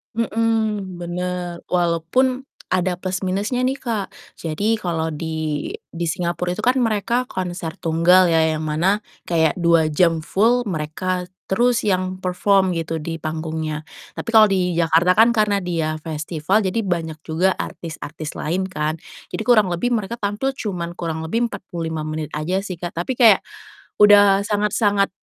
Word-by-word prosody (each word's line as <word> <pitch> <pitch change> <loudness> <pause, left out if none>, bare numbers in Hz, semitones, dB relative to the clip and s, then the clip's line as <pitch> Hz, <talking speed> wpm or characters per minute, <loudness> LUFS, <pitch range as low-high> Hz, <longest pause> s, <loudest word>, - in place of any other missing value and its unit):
Mhm, 220 -4 0
bener 175 0 -4
walaupun 180 +10 +1 0.2
ada 185 0 +1
plus 185 -1 -2
minusnya 205 +7 -1
nih 265 +2 0
Kak. 220 -6 -3 0.2
Jadi 205 +8 -1
kalau 165 -4 -2
di 155 -1 -3 0.2
di 170 0 -4
Singapore 175 +1 -2
itu - - -3
kan 255 +2 +3
mereka 235 +1 +1
konser 175 -5 -4
tunggal 175 +2 +4
ya, 165 -1 +4
yang 155 - -3
mana 175 +7 +1 0.2
kayak 160 -1 +1
2 170 -2 +3
jam 165 +1 +2
full 225 +9 +2
mereka 180 +3 -2 0.2
terus 240 +4 +2
yang 185 -1 0
perform 190 0 +2
gitu 165 0 -2
di 165 +1 -4
panggungnya. 155 -1 -4 0.4
Tapi - - -5
kalau 220 -1 +9
di 180 -2 +1
Jakarta 170 +2 +3
kan 225 +2 +7
karena 210 -3 +2
dia 165 -3 -2
festival 160 +5 0
jadi 190 +4 0
banyak 165 -4 -2
juga 170 +4 +2
artis-artis 155 -2 -6
lain 180 +5 -1
kan, 155 -3 -1 0.4
jadi - - -2
kurang 215 -5 +5
lebih 175 +8 0
mereka 220 -1 -1
tampil 210 +7 -1
cuman 180 -9 -4
kurang 160 -2 -3
lebih 230 +9 0
45 165 -5 -5
menit 155 0 -4
aja 180 +6 -1
sih 190 -3 -6
Kak. 175 +1 -5
Tapi 250 +7 -3
kayak 225 -5 +6 0.6
udah 205 -1 +7
sangat-sangat 205 -1 +1
180 Hz, 150 wpm, -21 LUFS, 165-205 Hz, 0.6 s, kalau